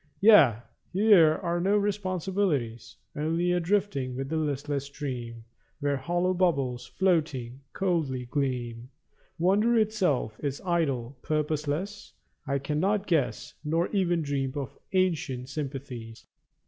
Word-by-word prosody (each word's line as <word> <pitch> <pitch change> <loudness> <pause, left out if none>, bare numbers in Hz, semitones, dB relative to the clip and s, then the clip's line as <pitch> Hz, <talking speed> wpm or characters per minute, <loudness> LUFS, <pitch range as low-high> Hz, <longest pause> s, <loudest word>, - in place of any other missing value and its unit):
Yea, 195 - +7 0.4
here 185 -6 +6
are 170 0 0
no 200 +3 +3
responsibilities. 185 - -1 0.2
Only 165 +4 0
a 180 - +2
drifting 170 -9 0
with 135 +1 -4
the 160 - -2
listless 145 -2 -1
stream 125 -5 -6 0.4
Where 145 -1 0
hollow 175 +7 0
bubbles, 135 -9 0
floating, 150 -9 0
coldly 155 -9 -1
gleam. 125 -3 -3 0.5
Wonder 205 +7 +3
itself 190 - +1
is 140 -1 -2
idle, 140 -8 -1
purposeless; 155 +6 -2 0.3
I 140 +1 +1
cannot 175 +9 0
guess 160 -9 0
Nor 165 +3 0
even 175 -5 +1
dream 135 -2 -2
of 140 -3 -5 0.2
ancient 155 -9 0
sympathies. 135 -6 -6
150 Hz, 115 wpm, -28 LUFS, 130-185 Hz, 0.5 s, Yea